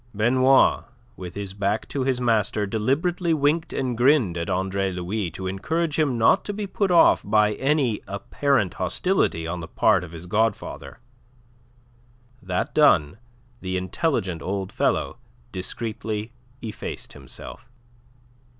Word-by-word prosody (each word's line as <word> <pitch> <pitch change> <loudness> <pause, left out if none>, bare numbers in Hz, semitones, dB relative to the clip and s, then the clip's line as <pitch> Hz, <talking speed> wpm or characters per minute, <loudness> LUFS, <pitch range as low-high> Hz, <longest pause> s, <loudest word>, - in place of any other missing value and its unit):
Benoit, 130 +5 +4 0.3
with 90 -1 -8
his 100 -2 -5
back 100 +2 -1
to 135 - -2
his 130 -1 0
master, 110 -3 +1
deliberately 160 - 0
winked 150 +3 +1
and 130 -3 -2
grinned 120 - +3
at 85 -1 -3
Andre 95 +1 -1
Louis 90 +2 -3
to 95 - -7
encourage 155 - -1
him 140 -6 +1
not 115 - +4
to 205 - -3
be 210 0 -4
put 195 0 -1
off 175 -2 +5
by 105 -1 +3
any 135 -2 0
apparent 100 +2 0
hostility 90 - 0
on 85 +1 -4
the 80 - -7
part - - +2
of 85 - -9
his 85 0 -9
godfather. 110 +3 -2 1.4
That 90 -1 -2
done, 100 - +4 0.4
the 95 0 -3
intelligent 95 - -1
old 95 0 -3
fellow - - 0 0.3
discreetly 110 +3 -4 0.3
effaced 110 -2 -6
himself. - - -10
110 Hz, 130 wpm, -24 LUFS, 95-140 Hz, 1.4 s, off